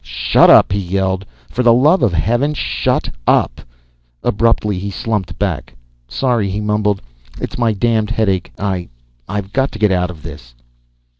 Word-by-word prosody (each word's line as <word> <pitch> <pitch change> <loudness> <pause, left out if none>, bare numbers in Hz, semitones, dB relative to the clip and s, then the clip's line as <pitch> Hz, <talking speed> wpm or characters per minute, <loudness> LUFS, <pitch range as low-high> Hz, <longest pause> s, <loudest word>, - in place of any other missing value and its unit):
"Shut 60 0 +3
up!" - - +7
he 100 - 0
yelled. 95 +1 -2 0.2
"For 125 - -1
the 120 -2 +5
love 150 +9 +4
of 110 - +3
Heaven, 120 - 0
shut - - -1 0.2
up!" - - +2 0.6
Abruptly 105 -3 +1
he 100 +2 -4
slumped 105 -1 -3
back. 95 -8 -3 0.3
"Sorry," 120 - 0
he 100 +2 -3
mumbled. 105 -1 0 0.4
"It's - - -5
my 115 -2 +2
damned 110 0 0
headache. 100 -6 0
I 95 -3 -3 0.4
I've 100 0 -4
got 135 0 +1
to - - -6
get 105 -1 +2
out 90 -1 +1
of 80 -4 -10
this." - - -11
100 Hz, 160 wpm, -17 LUFS, 95-115 Hz, 0.6 s, up